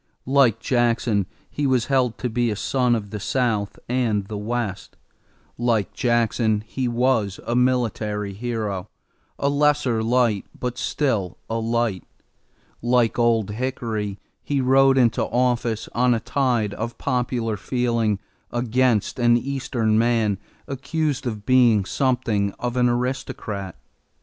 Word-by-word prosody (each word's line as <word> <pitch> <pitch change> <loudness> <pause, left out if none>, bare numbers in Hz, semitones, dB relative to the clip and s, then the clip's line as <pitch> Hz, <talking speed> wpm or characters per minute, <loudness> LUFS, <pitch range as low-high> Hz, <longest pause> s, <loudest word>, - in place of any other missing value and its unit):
Like 130 -4 +4
Jackson 115 -5 +1 0.2
he 145 -1 -2
was 130 -3 +2
held 130 -4 +1
to 125 - -2
be 120 0 0
a 105 - -1
son 125 +3 +1
of 100 -3 -5
the 105 - -4
South 110 -3 -1
and 115 -5 0
the 105 - -6
West. 105 -2 -4 0.6
Like 115 -4 +1
Jackson 115 -3 +1
he 125 +2 -2
was 120 -4 +1
a 120 - -1
military 110 -5 0
hero, 105 -3 -3 0.5
a 140 - 0
lesser 145 -5 +2
light, 115 -3 +1
but 125 -1 -3
still 110 - -1
a 115 - 0
light. 115 -4 0 0.8
Like 120 -1 +2
Old 115 -3 +2
Hickory 110 -4 -3 0.2
he 145 -1 -1
rode 135 +1 +4
into 120 -3 +3
office 120 -2 0
on 125 +1 +3
a - - -1
tide 120 -4 0
of 115 +1 -5
popular 125 -4 -1
feeling 115 -1 0 0.3
against 120 -1 +1
an 120 0 +5
Eastern 120 -4 0
man 115 -4 +2 0.3
accused 140 0 -2
of 105 -3 -5
being 120 -6 +4
something 110 -6 0
of 120 0 -4
an 125 -1 +3
aristocrat. 120 -6 -3
120 Hz, 130 wpm, -23 LUFS, 110-125 Hz, 0.8 s, an